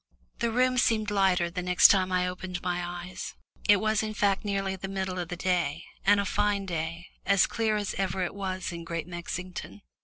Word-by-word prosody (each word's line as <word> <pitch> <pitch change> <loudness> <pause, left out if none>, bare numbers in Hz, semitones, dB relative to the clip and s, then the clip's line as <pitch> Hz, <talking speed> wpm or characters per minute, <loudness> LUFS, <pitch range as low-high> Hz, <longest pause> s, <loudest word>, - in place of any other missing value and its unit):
The 235 - +1
room 255 +2 +2
seemed 220 -3 +2
lighter 190 -4 +2
the 180 +1 -3
next 180 -1 +6
time 185 -2 +3
I 180 0 +2
opened 180 0 -5
my 180 0 -1
eyes. 175 +1 -6 0.3
It 205 - +9
was 215 +1 +1
in 215 -1 -4
fact 200 -1 +2
nearly 195 -2 -1
the 190 +1 -6
middle 190 -1 -3
of 175 - -3
the 180 - -3
day, 175 -3 0 0.2
and 205 +1 +5
a 200 - 0
fine 205 0 +1
day 165 -1 -3 0.2
as 200 -2 +4
clear 220 -2 0
as 205 -2 -2
it - - -7
ever 185 -2 -1
was 185 -2 -3
in 170 -1 -6
Great 165 -1 -4
Mexington. 180 +3 -6
185 Hz, 205 wpm, -28 LUFS, 180-200 Hz, 0.3 s, It